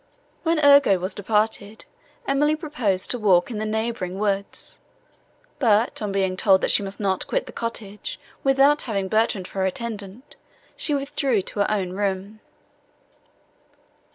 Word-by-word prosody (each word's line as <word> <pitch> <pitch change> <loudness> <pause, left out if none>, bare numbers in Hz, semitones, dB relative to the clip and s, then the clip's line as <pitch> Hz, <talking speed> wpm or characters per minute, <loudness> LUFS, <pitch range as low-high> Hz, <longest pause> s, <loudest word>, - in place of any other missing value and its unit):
When 330 -1 +1
Ugo 285 -9 +6
was 185 +2 -4
departed, 210 +1 -1 0.4
Emily 295 +3 +2
proposed 245 - -1
to 245 - 0
walk 190 -2 +3
in 215 - -4
the 215 - -2
neighbouring 220 -4 -3
woods; 200 -1 -2 0.8
but, 225 -3 +2
on 210 -2 -2
being 190 -1 0
told, 190 0 +4
that - - +2
she - - +6
must 195 0 -6
not 195 -3 0
quit - - -1
the - - -10
cottage, 230 - -5 0.2
without 275 +2 +4
having 200 -5 -2
Bertrand 215 -3 +1
for 195 - -7
her 190 - +2
attendant, 215 +4 -6 0.4
she 295 - +1
withdrew 275 -6 0
to 205 - -6
her 205 - +2
own 195 -4 -1
room. 200 +2 -3
215 Hz, 150 wpm, -23 LUFS, 195-255 Hz, 0.8 s, Ugo